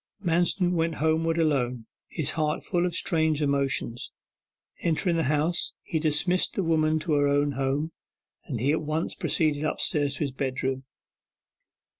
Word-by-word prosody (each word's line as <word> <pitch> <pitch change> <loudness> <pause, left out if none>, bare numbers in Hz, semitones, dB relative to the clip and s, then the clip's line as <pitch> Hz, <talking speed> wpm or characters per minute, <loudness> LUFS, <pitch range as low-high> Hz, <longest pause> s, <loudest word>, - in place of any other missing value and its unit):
Manston 175 +2 +2
went 165 -1 0
homeward 160 +1 +1
alone, 125 -7 +1 0.2
his 155 -5 -2
heart 155 -1 -1
full 175 -1 +1
of 175 - -3
strange 160 -5 +1
emotions. 140 -4 -1 0.7
Entering 170 +1 +1
the 165 -2 +1
house, 155 +5 +1 0.2
and 160 - +2
dismissing 165 +4 +1
the 195 - 0
woman 155 -1 +2
to 155 -1 -1
her 145 -1 +3
own 145 0 +2
home, 140 +4 -1 0.7
he 130 +6 +1
at 160 - +1
once 155 +2 -2
proceeded 155 -2 0
upstairs 145 -2 0
to - - -5
his 140 - -2
bedroom. 130 0 -2
155 Hz, 145 wpm, -27 LUFS, 140-165 Hz, 0.7 s, her